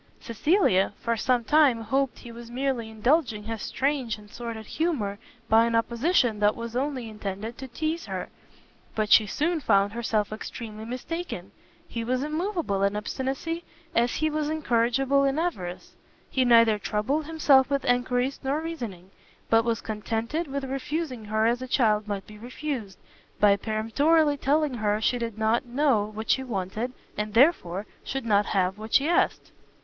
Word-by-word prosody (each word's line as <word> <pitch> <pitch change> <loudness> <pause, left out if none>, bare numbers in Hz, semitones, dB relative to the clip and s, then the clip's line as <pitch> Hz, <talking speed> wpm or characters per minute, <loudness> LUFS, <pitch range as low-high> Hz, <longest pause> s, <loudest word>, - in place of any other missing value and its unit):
Cecilia 230 - +2
for 230 0 0
some 245 +2 +1
time 280 -3 +4
hoped 265 +4 0
he 235 - -10
was 235 0 -10
merely 250 -2 -2
indulging 220 0 +1
his 225 0 -5
strange 265 -5 -1
and 210 0 -16
sordid 230 -2 -6
humour 240 -12 -1 0.3
by 225 +1 +5
an 230 - 0
opposition 235 - +2
that 210 0 +3
was 235 0 -6
only 260 -2 -2
intended 210 +1 -5
to 265 - -6
teize 315 +6 -3
her; - - -4 0.7
but 215 -1 -1
she 215 - +7
soon 320 - 0
found 200 -6 +2
herself 215 -3 -1
extremely 220 0 -7
mistaken: 310 +9 -5 0.4
he 230 - -4
was 255 +3 0
immoveable 310 - -1
in 200 +1 +2
obstinacy, 270 +10 -3 0.3
as 235 +1 +2
he 310 - +1
was 305 -1 -1
incorrigible 270 -1 +2
in 275 +1 +1
avarice; 185 - -3 0.4
he 260 - +2
neither 230 -3 +5
troubled 245 +10 -1
himself 290 -5 +4
with 280 -1 0
enquiries 245 +2 +1
nor 275 +3 0
reasoning, 235 - -6 0.4
but 225 0 +5
was 230 -1 -1
contented 225 +9 -3
with 280 0 -4
refusing 270 -2 -3
her 215 +1 +1
as 240 +2 +2
a 255 - -5
child 215 -4 +2
might 200 -2 -3
be 210 0 -13
refused, 245 -4 -5 0.4
by 205 -1 +6
peremptorily 280 +10 +2
telling 290 +1 +1
her 210 -3 0
she 245 +3 +1
did 230 -2 -4
not 225 +4 +1
know 250 -4 +2
what 220 +1 -1
she 265 - +2
wanted, 220 +1 -3 0.2
and 210 0 -4
therefore 215 - +3 0.2
should 270 -2 -4
not 210 -1 +3
have 190 0 0
what 220 +1 -3
she 285 - +5
asked. 345 - +1
235 Hz, 165 wpm, -26 LUFS, 215-280 Hz, 0.7 s, she